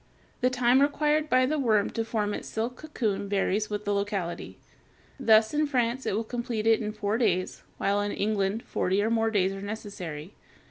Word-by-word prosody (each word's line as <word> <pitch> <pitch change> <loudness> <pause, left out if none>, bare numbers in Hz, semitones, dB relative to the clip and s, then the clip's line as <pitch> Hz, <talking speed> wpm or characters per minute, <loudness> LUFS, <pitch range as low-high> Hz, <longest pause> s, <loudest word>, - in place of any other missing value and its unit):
The 250 - +3
time 255 +1 +3
required 300 +1 +2
by 255 0 +4
the 300 +3 0
worm 220 -6 +2
to 225 - -2
form 215 -2 -1
its - - -5
silk 230 +3 -3
cocoon 215 -10 -2
varies 205 +1 0
with 210 0 -4
the 205 - +1
locality. 200 -4 -3 0.6
Thus 220 -2 +5
in 300 0 +2
France 250 -2 0
it - - 0
will 225 - 0
complete 235 -1 -3
it 225 0 +4
in 210 -1 -2
four 210 +1 -2
days, 185 -6 0 0.2
while 200 +1 +1
in 205 0 -2
England 205 +1 -1
forty 190 +3 0
or 220 - 0
more 225 -1 +2
days 195 -3 +1
are 195 - -7
necessary. 195 -6 -6
220 Hz, 190 wpm, -27 LUFS, 200-245 Hz, 0.6 s, Thus